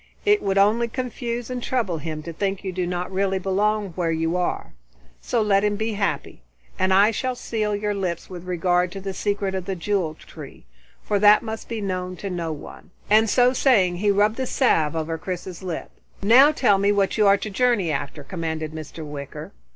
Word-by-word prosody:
It 415 Hz, 0 st, +4 dB
would 195 Hz, 0 st, 0 dB
only 215 Hz, +4 st, +4 dB
confuse 245 Hz, -1 st, -4 dB
and 250 Hz, -1 st, -3 dB
trouble 225 Hz, -11 st, -1 dB
him 155 Hz, 0 st, -5 dB
to 170 Hz, -, -7 dB
think 195 Hz, +3 st, -2 dB
you 190 Hz, -, -3 dB
do 180 Hz, -1 st, -2 dB
not 180 Hz, +1 st, -3 dB
really 195 Hz, 0 st, 0 dB
belong 200 Hz, +2 st, 0 dB
where 170 Hz, -1 st, -2 dB
you 165 Hz, +1 st, 0 dB
are. 180 Hz, -1 st, -2 dB, 0.5 s
So 230 Hz, -3 st, 0 dB
let 200 Hz, -1 st, +3 dB
him 210 Hz, 0 st, +1 dB
be 220 Hz, +1 st, -2 dB
happy. 200 Hz, -, -2 dB, 0.4 s
And 185 Hz, 0 st, +2 dB
I 200 Hz, +3 st, +5 dB
shall 255 Hz, +3 st, -2 dB
seal 215 Hz, -3 st, -2 dB
your 205 Hz, 0 st, -1 dB
lips 185 Hz, -4 st, -3 dB
with 180 Hz, -1 st, -9 dB
regard 180 Hz, 0 st, +1 dB
to 195 Hz, -, -6 dB
the 195 Hz, 0 st, -5 dB
secret 200 Hz, 0 st, -1 dB
of 190 Hz, -2 st, -3 dB
the 195 Hz, -, -3 dB
Jewel 180 Hz, -3 st, -1 dB
Tree, -, -, -12 dB, 0.4 s
for 205 Hz, -1 st, 0 dB
that 210 Hz, +2 st, +6 dB
must 220 Hz, -1 st, -6 dB
be 230 Hz, -2 st, -3 dB
known 185 Hz, -2 st, -3 dB
to 195 Hz, +2 st, -6 dB
no 170 Hz, -2 st, -3 dB
one," 150 Hz, +3 st, -10 dB, 0.2 s
and 220 Hz, +1 st, +5 dB
so 250 Hz, +2 st, +4 dB
saying 200 Hz, -10 st, +3 dB
he 205 Hz, +3 st, +1 dB
rubbed 210 Hz, +4 st, +2 dB
a 260 Hz, -, -1 dB
salve 165 Hz, -, +2 dB
over 160 Hz, 0 st, -2 dB
Chris's 180 Hz, 0 st, -6 dB
lips. 180 Hz, -3 st, -5 dB, 0.3 s
"Now 255 Hz, +8 st, +7 dB
tell 215 Hz, -10 st, +3 dB
me 200 Hz, +1 st, +3 dB
what 200 Hz, +1 st, +1 dB
you 210 Hz, -, +5 dB
are 200 Hz, 0 st, +6 dB
to 215 Hz, -, -6 dB
journey 230 Hz, -6 st, +2 dB
after," 145 Hz, +1 st, -4 dB
commanded 160 Hz, -1 st, -4 dB
Mr. 155 Hz, 0 st, -8 dB
Wicker. 145 Hz, -2 st, -8 dB
195 Hz, 205 wpm, -23 LUFS, 175-215 Hz, 0.5 s, Now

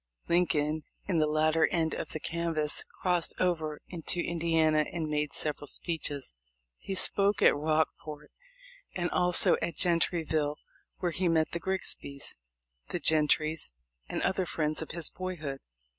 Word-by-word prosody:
Lincoln, 155 Hz, -3 st, +2 dB, 0.3 s
in 180 Hz, -5 st, +2 dB
the 155 Hz, -, +3 dB
latter 155 Hz, +1 st, +3 dB
end 160 Hz, -2 st, 0 dB
of -, -, -4 dB
the 155 Hz, -, -5 dB
canvass, 165 Hz, -2 st, 0 dB, 0.2 s
crossed 180 Hz, -2 st, +1 dB
over 160 Hz, -4 st, 0 dB
into 175 Hz, 0 st, -2 dB
Indiana 165 Hz, -2 st, +2 dB
and 165 Hz, -2 st, -2 dB
made 150 Hz, -1 st, -1 dB
several 145 Hz, -1 st, -3 dB
speeches. 145 Hz, -, -2 dB, 0.6 s
Lie 195 Hz, -, 0 dB
spoke 200 Hz, +2 st, +2 dB
at -, -, +7 dB
Rockport 155 Hz, 0 st, -1 dB, 0.6 s
and 175 Hz, -1 st, -1 dB
also 180 Hz, -1 st, +4 dB
at 170 Hz, -, -2 dB
Gentryville, 160 Hz, -4 st, +1 dB, 0.4 s
where 175 Hz, -2 st, -1 dB
he 180 Hz, +2 st, 0 dB
met 160 Hz, -2 st, +2 dB
the 170 Hz, -, -2 dB
Grigsbys, 170 Hz, -6 st, 0 dB, 0.5 s
the -, -, -3 dB
Gentrys, 155 Hz, -, +2 dB, 0.4 s
and -, -, -2 dB
other 185 Hz, -1 st, +1 dB
friends 155 Hz, -1 st, -1 dB
of 160 Hz, -, -6 dB
his 170 Hz, -1 st, -1 dB
boyhood. 155 Hz, -7 st, -5 dB
160 Hz, 140 wpm, -30 LUFS, 155-175 Hz, 0.6 s, at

